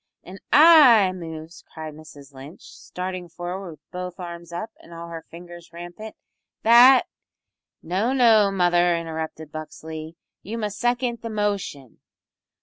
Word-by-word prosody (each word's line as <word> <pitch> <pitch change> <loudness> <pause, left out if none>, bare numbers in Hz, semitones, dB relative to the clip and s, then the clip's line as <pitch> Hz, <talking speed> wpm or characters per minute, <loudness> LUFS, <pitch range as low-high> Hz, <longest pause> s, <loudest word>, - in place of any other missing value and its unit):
"An' 190 +2 -11
I 285 - +7
moves," 165 -2 -9
cried 155 -1 -8
Mrs 145 -2 -14
Lynch, 135 +5 -12
starting 180 -1 -7
forward 175 +2 -6
with 150 -2 -15
both 180 0 -7
arms 170 -1 -8
up 195 +6 -6
and - - -17
all 170 0 -9
her 165 -1 -8
fingers 175 0 -12
rampant, 175 +6 -10 0.5
"that 245 +3 +7 0.4
" - - -62 0.3
"No, 190 +9 -1
no, 225 -6 +4
mother," 175 -2 +2
interrupted 160 -2 -6
Buxley, 155 +1 -8 0.3
"you 220 +4 -6
must 210 -2 -4
second 240 0 -1
the 230 - -6
motion." 200 - -4
175 Hz, 140 wpm, -23 LUFS, 165-210 Hz, 0.5 s, I